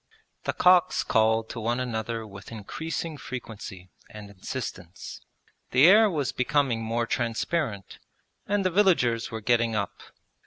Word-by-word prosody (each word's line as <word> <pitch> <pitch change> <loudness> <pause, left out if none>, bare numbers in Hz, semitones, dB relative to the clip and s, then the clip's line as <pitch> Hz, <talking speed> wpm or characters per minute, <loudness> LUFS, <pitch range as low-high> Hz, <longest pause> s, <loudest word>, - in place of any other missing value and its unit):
The - - 0
cocks 180 0 +4
called 110 0 +2
to 115 - -6
one 120 +2 -1
another 115 -2 -3
with 100 -1 -11
increasing 160 +8 -5
frequency 105 -7 -8 0.2
and 105 -1 -10
insistence. 95 -3 -7 0.5
The 130 +4 +5
air 210 +4 +7
was 150 -7 -1
becoming 125 -2 +1
more 115 +1 -1
transparent, 115 - -2 0.5
and 200 -1 0
the 185 - +2
villagers 165 - +3
were 110 0 -5
getting 115 0 +2
up. 100 -2 -3
115 Hz, 130 wpm, -26 LUFS, 110-150 Hz, 0.5 s, air